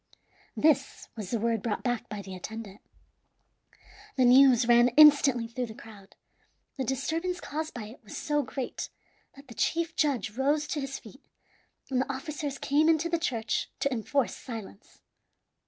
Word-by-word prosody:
This 290 -3 +1
was 210 -5 -6
the 235 - 0
word 230 -1 0
brought 215 -1 -3
back 245 -2 -2
by 210 -2 -6
the 190 - -9
attendant. 210 +2 -8 1.3
The 255 - +3
news 250 -1 +6
ran 240 0 +6
instantly 285 -6 +7
through 245 +1 -4
the 220 - -10
crowd. 205 -4 -14 0.6
The 265 - -1
disturbance 325 +8 -2
caused 310 0 -5
by 240 - -5
it 225 +4 -12
was 210 - -9
so 295 -1 0
great 260 0 -5 0.5
that 275 0 -15
the 235 - -11
chief 330 +7 -1
judge 265 -9 0
rose 285 +6 +1
to 295 - -2
his 270 0 -4
feet, 255 +4 -15 0.7
and 255 -1 +2
the 275 - -2
officers 285 0 -5
came 300 +4 +2
into 325 +1 +2
the 335 -1 0
church, 230 -8 -1
to 280 - +1
enforce 250 +3 -1
silence. 220 - -10
260 Hz, 160 wpm, -28 LUFS, 225-295 Hz, 1.3 s, instantly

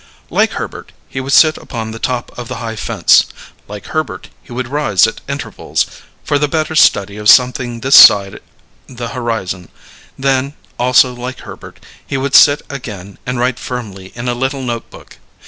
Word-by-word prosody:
Like - - +1
Herbert - - -7
he 130 - -5
would 135 +1 -5
sit 155 +2 +5
upon 110 -1 -6
the 115 - -8
top 125 0 -3
of 120 -1 -7
the - - -6
high 115 -2 -5
fence; - - +3 0.4
like 105 0 -9
Herbert 155 -2 -4
he - - -18
would 125 0 -4
rise 130 -9 +2
at 115 - -4
intervals, 140 -1 -2 0.4
for 145 -1 0
the 150 - +1
better 155 +2 -2
study 100 -9 +3
of 105 0 +1
something 125 -2 +3
this 135 +2 +5
side 100 -1 +7 0.5
the 120 -2 -6
horizon; 110 -8 -4 0.5
then, 135 +1 0 0.2
also 125 +1 +4
like 125 +1 -7
Herbert, - - -12 0.2
he 135 - -4
would 135 +1 -3
sit 145 0 +6
again 105 -8 -9
and 125 0 -2
write 125 0 0
firmly 100 -7 -7
in 120 +1 -6
a 120 - 0
little 130 +2 -3
notebook. 120 -2 -7
125 Hz, 170 wpm, -15 LUFS, 115-135 Hz, 0.5 s, side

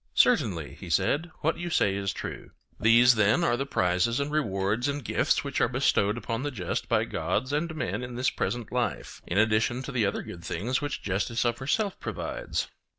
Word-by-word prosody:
Certainly, 85 - +2
he 90 - -8
said, 145 - +1
what 160 +2 0
you 175 0 -3
say 100 - +2
is 100 0 -1
true. - - -7 0.3
These, 120 +3 +6
then, 110 -1 +3
are 120 - +3
the 135 +3 -3
prizes 95 +2 +1
and 140 +1 -2
rewards 110 -4 0
and 140 -3 -3
gifts - - +1
which - - -2
are - - +4
bestowed 105 +3 +2
upon 115 +1 -3
the 145 - -1
just 100 -10 -3
by - - +2
gods 130 +6 -2
and 160 +2 -1
men 105 - -2
in 125 -1 -6
this 125 +1 +1
present 120 -2 -3
life, 125 -1 -2
in 85 - -1
addition 110 +4 +2
to 140 - -6
the 120 -6 +1
other 100 - -2
good 85 -1 -9
things 125 +7 -1
which 145 0 -4
justice 105 +5 -1
of 120 0 0
herself 195 +10 -1
provides. - - -3
120 Hz, 200 wpm, -27 LUFS, 100-140 Hz, 0.3 s, These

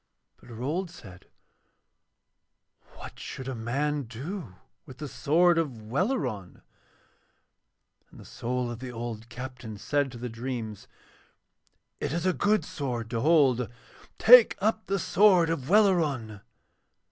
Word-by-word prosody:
But - - -18
Rold 145 +11 -3
said: 100 - -14 1.7
'What - - -11
should 130 - -7
a 135 - -3
man 140 +5 -2
do 125 - -7 0.3
with 130 -2 -11
the 150 +1 -6
sword 165 +6 +3
of 145 -8 -2
Welleran?' 135 - -2 1.5
And - - -16
the - - -12
soul 125 0 -3
of 120 - -7
the 130 0 -7
old 115 -1 -6
captain 125 -3 -8
said 140 +6 -1
to 120 - -9
the 125 +1 -5
dreams: 115 -3 -6 1.1
'It 145 - -2
is 170 +2 -2
a 185 - +3
good 210 +3 +1
sword 120 -5 -4
to 115 -2 -1
hold: 135 -6 +3 0.5
take 245 0 +8
up 220 +2 -1
the 195 - 0
sword 185 -2 +4
of 140 -4 -4
Welleran.' 155 - +2
130 Hz, 130 wpm, -27 LUFS, 120-170 Hz, 1.7 s, take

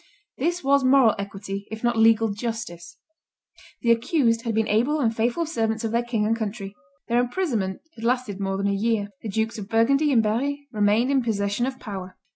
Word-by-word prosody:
This 345 +5 -1
was 280 0 +3
moral 255 -3 +5
equity, 200 0 -6
if 220 +1 -7
not 240 0 +2
legal 225 0 +4
justice. 200 -6 -5 0.9
The 235 - +4
accused 230 -1 +2
had 225 -2 -1
been 220 0 +1
able 245 +9 +2
and 230 -5 +1
faithful 240 +9 0
servants 225 -7 -1
of 225 - -1
their 235 +1 +2
king 235 -3 -1
and 225 +1 +2
country. 205 -3 -5 0.3
Their 235 +1 +2
imprisonment 245 - -1
had 225 - -11
lasted 240 -4 -1
more 195 -1 -2
than 200 - -2
a 200 - +1
year. 205 0 0
The 220 - -5
Dukes 220 +2 -1
of 200 -1 -8
Burgundy 275 +7 +3
and 230 -4 +4
Berry 280 +7 -1
remained 215 +3 +2
in 270 -1 +3
possession 210 0 -1
of 260 -1 -5
power. 190 -4 -7
225 Hz, 195 wpm, -24 LUFS, 205-245 Hz, 0.9 s, moral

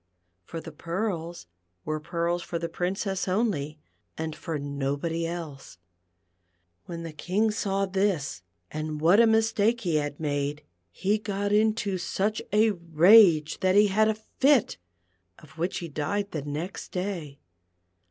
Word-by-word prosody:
For 165 - -6
the 165 - -9
pearls 170 +1 -4 0.4
were 155 0 -2
pearls 170 +2 -1
for 170 - -4
the 170 0 -3
Prin 180 +3 -2
cess 195 -2 -2
only, 185 -7 0 0.4
and 160 -1 -4
for 160 -2 -4
nobody 145 +4 -2
else. 155 - -7 1.1
When 170 -1 -6
the 165 -2 -7
King 195 +8 0
saw 195 -2 0
this, 190 - -1 0.3
and 155 0 -4
what 170 +7 +5
a 235 - +7
mistake 225 +1 +2
he 170 -7 +1
had 145 -1 -3
made, 145 -1 -2 0.3
he 200 - 0
got 205 -1 -2
into 210 -2 +2
such 205 +4 -1
a 215 +1 +4
rage 170 -1 +5
that 185 0 +2
he 205 0 +6
had 215 +3 +3
a 220 - +1
fit, 260 - +2 0.6
of 155 +1 -17
which 175 +3 -1
he 170 - -4
died 180 +7 -2
the 155 - -3
next 150 +6 -5
day. 180 -7 -4
175 Hz, 145 wpm, -27 LUFS, 155-205 Hz, 1.1 s, a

